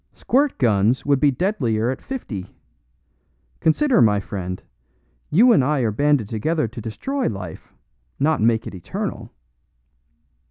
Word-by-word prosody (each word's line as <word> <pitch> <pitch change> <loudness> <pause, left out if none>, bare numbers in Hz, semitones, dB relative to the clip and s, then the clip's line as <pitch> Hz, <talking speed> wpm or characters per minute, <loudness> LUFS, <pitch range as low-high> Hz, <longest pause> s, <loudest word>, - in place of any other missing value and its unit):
Squirt 280 +3 +1
guns 110 +1 +2
would 140 -2 +3
be 145 - +4
deadlier 125 - 0
at 130 - -6
fifty. 115 - -7 1.0
Consider, 255 - +3
my 105 -3 +4
friend, 90 -2 -6 0.7
you 230 +10 +5
and 140 - +5
I 145 +1 +1
are 115 -3 +1
banded 140 0 +1
together 155 +7 -1
to 115 +1 -8
destroy 265 - -3
life, 90 -6 -8 0.5
not 155 -1 +2
make 115 0 +2
it - - -7
eternal." 90 -3 -5
125 Hz, 130 wpm, -22 LUFS, 105-160 Hz, 1.0 s, you